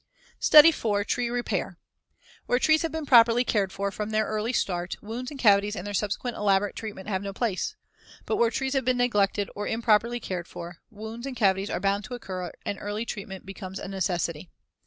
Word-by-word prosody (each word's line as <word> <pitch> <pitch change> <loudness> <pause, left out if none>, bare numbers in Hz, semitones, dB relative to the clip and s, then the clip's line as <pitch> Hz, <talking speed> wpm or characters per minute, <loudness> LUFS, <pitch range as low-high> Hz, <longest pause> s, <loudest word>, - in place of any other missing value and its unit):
STUDY 305 +2 +9
IV. 205 -9 -1
TREE 245 +1 -1
REPAIR 245 0 -2 0.7
Where 245 - +3
trees 310 +4 +3
have 330 - -2
been 320 -1 -4
properly 235 -2 +6
cared 200 -6 0
for 200 +1 -2
from 210 +1 -4
their 215 0 +1
early 215 +2 -2
start, 175 -7 -1
wounds 235 +4 -6
and 285 - -9
cavities 205 -2 +4
and 180 - -6
their 205 - -5
subsequent 210 +4 -2
elaborate 200 0 +1
treatment 210 -4 -7
have 190 -3 -1
no 200 -1 -5
place. 205 -3 -2 0.5
But - - -1
where 235 - +4
trees 265 +3 -2
have 270 -1 +1
been 250 0 +1
neglected 205 -4 +1
or 205 - -3
improperly 230 +1 +2
cared 180 -6 -5
for, 170 0 -8
wounds 225 +3 -7
and 265 - -5
cavities 195 -3 +2
are - - -2
bound 200 +1 0
to 245 - -6
occur 185 -6 -6
and 200 - -3
early 210 +2 -3
treatment 195 -3 -7
becomes 190 -1 -7
a - - -6
necessity. 175 -4 -2
210 Hz, 200 wpm, -26 LUFS, 195-240 Hz, 0.7 s, STUDY